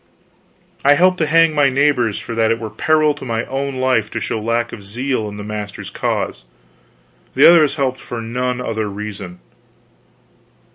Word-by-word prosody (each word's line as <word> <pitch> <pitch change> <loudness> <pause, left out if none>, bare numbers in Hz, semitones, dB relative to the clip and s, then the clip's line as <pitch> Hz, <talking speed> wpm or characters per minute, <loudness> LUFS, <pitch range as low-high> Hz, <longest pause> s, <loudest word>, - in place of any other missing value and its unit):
I 145 +1 +6
helped 185 +3 +3
to 155 - +1
hang 165 +1 +4
my 145 -2 +3
neighbors 130 -5 +1
for 115 - -6
that 115 -1 +2
it 115 - +1
were 110 -1 -6
peril 155 +6 +2
to - - -11
my 115 -2 -2
own 135 0 -3
life 130 -4 +1
to - - -4
show 110 - -3
lack 115 +2 -1
of 105 - -9
zeal 115 +2 -2
in 105 - -9
the 105 - -6
master's 105 -1 -6
cause; - - -2 0.9
the - - +7
others 155 -4 +5
helped 130 -3 -1
for 120 - -7
none 125 +2 -2
other 110 -3 -3
reason. 100 -3 -7
120 Hz, 175 wpm, -18 LUFS, 110-140 Hz, 0.9 s, the